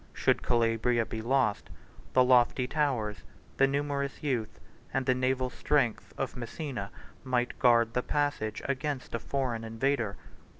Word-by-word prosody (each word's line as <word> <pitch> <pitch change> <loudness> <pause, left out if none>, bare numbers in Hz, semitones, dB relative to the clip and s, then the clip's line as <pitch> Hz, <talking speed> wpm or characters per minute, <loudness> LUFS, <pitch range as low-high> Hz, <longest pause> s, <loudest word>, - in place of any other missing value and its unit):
131 - - -8
Should - - +4
Calabria 115 0 +2
be 110 0 -5
lost, 120 -3 +1 0.4
the 130 - +6
lofty 125 0 +4
towers, 125 -8 0 0.4
the 135 - +5
numerous 140 0 -2
youth, 115 -6 -2 0.3
and 135 -1 -1
the 130 - +4
naval 130 0 0
strength, 135 -7 0
of - - -3
Messina, 120 -3 -5 0.3
132 130 - -12
might 125 -1 0
guard 115 -1 +4
the 125 - +1
passage 145 -7 -1
against 140 -1 -3
a 115 - -1
foreign 125 -5 -2
invader. 115 -1 -1
125 Hz, 145 wpm, -30 LUFS, 115-135 Hz, 0.4 s, the